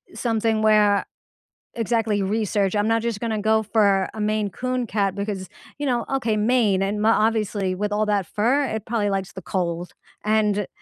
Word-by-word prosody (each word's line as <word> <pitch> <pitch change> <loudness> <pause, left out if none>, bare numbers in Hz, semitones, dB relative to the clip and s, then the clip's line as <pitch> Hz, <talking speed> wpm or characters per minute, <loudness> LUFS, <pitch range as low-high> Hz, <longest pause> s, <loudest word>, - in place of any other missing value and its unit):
something 225 -2 0
where 210 -2 +4 0.7
exactly 225 -2 0
research, 205 -1 0
I'm 210 +2 +1
not 225 0 +2
just 230 -2 -3
gonna 220 -2 -1
go 220 +1 +2
for 200 -3 +2
a 220 - -8
Maine 210 -1 0
Coon 255 +5 -2
cat 200 -2 0
because, 200 -2 -4 0.3
you 290 - -3
know 245 -3 0
okay, 230 -5 0
Maine, 210 -3 +2
and 205 +2 -1
ma 220 +1 +4 0.2
obviously 205 -4 -1
with 205 +2 -2
all 215 +1 +1
that 200 -4 0
fur, 255 +7 +1
it 220 -3 -4
probably 215 -3 0
likes 195 -1 -2
the 190 - -9
cold, 175 -1 -3 0.3
and 210 -2 +1
210 Hz, 180 wpm, -23 LUFS, 200-225 Hz, 0.7 s, where